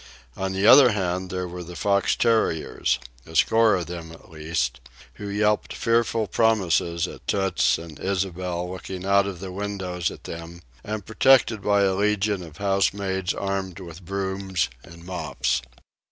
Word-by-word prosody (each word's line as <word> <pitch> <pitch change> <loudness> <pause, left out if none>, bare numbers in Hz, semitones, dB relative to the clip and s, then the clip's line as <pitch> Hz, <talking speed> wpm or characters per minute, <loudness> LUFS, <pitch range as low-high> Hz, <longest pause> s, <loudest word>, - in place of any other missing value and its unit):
On 95 0 -2
the 95 +1 0
other 125 -1 +8
hand, 95 -2 -2
there 90 -1 -3
were 90 +1 -7
the 90 +1 -10
fox 100 +1 +2
terriers, 110 - +1 0.3
a 80 - -11
score 110 +5 +4
of 90 -2 -2
them 85 0 -7
at 85 - -15
least, 75 -5 -2 0.4
who 100 - -4
yelped 105 +1 +1
fearful 115 -1 +1
promises 90 -5 +1
at - - -12
Toots 95 -1 +2
and 80 -2 -10
Ysabel 90 -2 -2
looking 95 0 -7
out 100 0 +4
of 95 -4 -6
the 95 0 -6
windows 95 -3 -3
at - - -11
them 85 +1 -8 0.2
and 105 -2 -5
protected 115 -2 +4
by 100 0 +3
a 95 -1 +3
legion 105 0 +1
of 80 -3 -11
housemaids 95 -1 0
armed 95 -2 -3
with 85 -1 -10
brooms 95 -3 -2
and 85 0 -14
mops. 80 -7 -1
95 Hz, 155 wpm, -24 LUFS, 85-100 Hz, 0.4 s, other